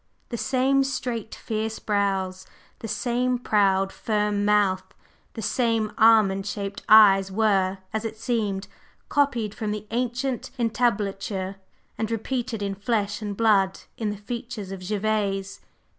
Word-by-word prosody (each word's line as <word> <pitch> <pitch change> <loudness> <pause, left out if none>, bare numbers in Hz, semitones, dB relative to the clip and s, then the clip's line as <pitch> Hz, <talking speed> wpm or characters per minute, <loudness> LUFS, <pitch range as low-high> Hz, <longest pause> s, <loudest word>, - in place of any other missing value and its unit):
The 240 - -3
same 270 +3 +2
straight, 240 -5 -3
fierce 220 0 -3
brows, 195 -3 -1 0.3
the 225 - -6
same 245 +3 0
proud, 195 -4 +2
firm 210 -2 0
mouth, 205 -3 +3 0.5
the 225 - -5
same 225 -3 +1
almond 215 -3 +4
shaped 200 -1 -4
eyes 195 -3 +7
were, 195 -2 +2 0.2
as 220 0 -1
it 220 -1 -5
seemed, 210 -4 -1 0.4
copied 245 -8 +1
from 215 -1 -4
the 210 0 -4
ancient 245 +2 -2
entablature 200 -5 -1 0.4
and 220 -1 -1
repeated 230 0 -2
in 200 -1 -1
flesh 205 +1 -1
and 205 -2 -4
blood 200 -4 +3
in 220 -2 -2
the 205 - -4
features 215 -1 -6
of 195 - -5
Gervase. 200 -1 -1
215 Hz, 130 wpm, -25 LUFS, 195-230 Hz, 0.5 s, eyes